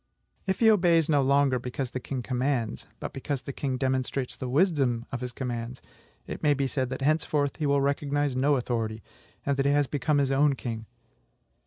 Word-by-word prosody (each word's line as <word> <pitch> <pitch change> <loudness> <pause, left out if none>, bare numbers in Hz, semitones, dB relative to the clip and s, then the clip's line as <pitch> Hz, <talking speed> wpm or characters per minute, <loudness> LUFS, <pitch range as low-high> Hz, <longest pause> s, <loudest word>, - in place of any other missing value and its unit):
If 190 +3 -1
he 220 -1 +7
obeys 170 -6 +4
no 145 -2 +4
longer 135 -1 +3
because 125 +1 -4
the 130 - -3
king 130 0 -4
commands, 125 -2 -1
but - - -5
because 135 0 -3
the 140 - -6
king 130 -2 -2
demonstrates 130 0 -1
the 130 - -5
wisdom 135 -6 +2
of 135 -2 -4
his 125 -1 -3
commands, 120 0 -4 0.5
it - - -6
may 145 -1 +3
be 140 0 0
said 130 -1 -1
that 130 +1 -4
henceforth 150 -1 +1
he 155 - 0
will 140 0 +3
recognize 140 0 0
no 140 +3 +3
authority, 115 -4 -2 0.4
and 140 -1 +1
that 135 - +1
he - - +4
has 145 0 +3
become 145 +2 0
his 140 -1 +2
own 140 +1 +3
king. 115 -3 -5
135 Hz, 195 wpm, -27 LUFS, 125-145 Hz, 0.5 s, he